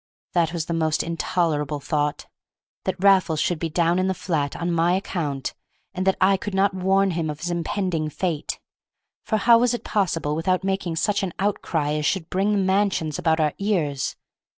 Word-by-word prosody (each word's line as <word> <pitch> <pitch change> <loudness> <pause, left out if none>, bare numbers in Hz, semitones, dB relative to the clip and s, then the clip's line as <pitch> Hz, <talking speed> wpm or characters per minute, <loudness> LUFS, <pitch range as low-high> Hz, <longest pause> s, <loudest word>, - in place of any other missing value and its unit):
That 170 -2 +2
was 170 -3 -3
the 170 - -3
most 160 -2 +1
intolerable 160 -3 -1
thought, 150 0 -1 0.6
that 185 - -2
Raffles 185 -5 +4
should 175 0 0
be 165 - -2
down 170 +2 +2
in 185 - +1
the 190 - 0
flat 150 -7 -2
on 170 +1 -2
my 170 +1 +2
account, 155 -8 -3 0.4
and 185 +1 -2
that 190 - +3
I 195 +1 +4
could 195 +1 -5
not 195 +1 +3
warn 190 +1 +2
him 165 -2 -2
of 150 0 -6
his 175 +1 -2
impending 170 -2 -1
fate; 160 -1 -3 0.6
for 220 - 0
how 230 +2 +6
was 245 0 +2
it - - -7
possible 165 -7 0
without 185 +3 0
making 190 -3 -1
such 205 +5 +1
an 190 -3 -3
outcry 170 -7 -1
as 150 0 0
should 175 -4 -1
bring 195 +3 +1
the - - +2
mansions 190 -5 +1
about 160 -1 +2
our 150 -2 +2
ears? 160 -10 -1
175 Hz, 190 wpm, -23 LUFS, 155-195 Hz, 0.6 s, how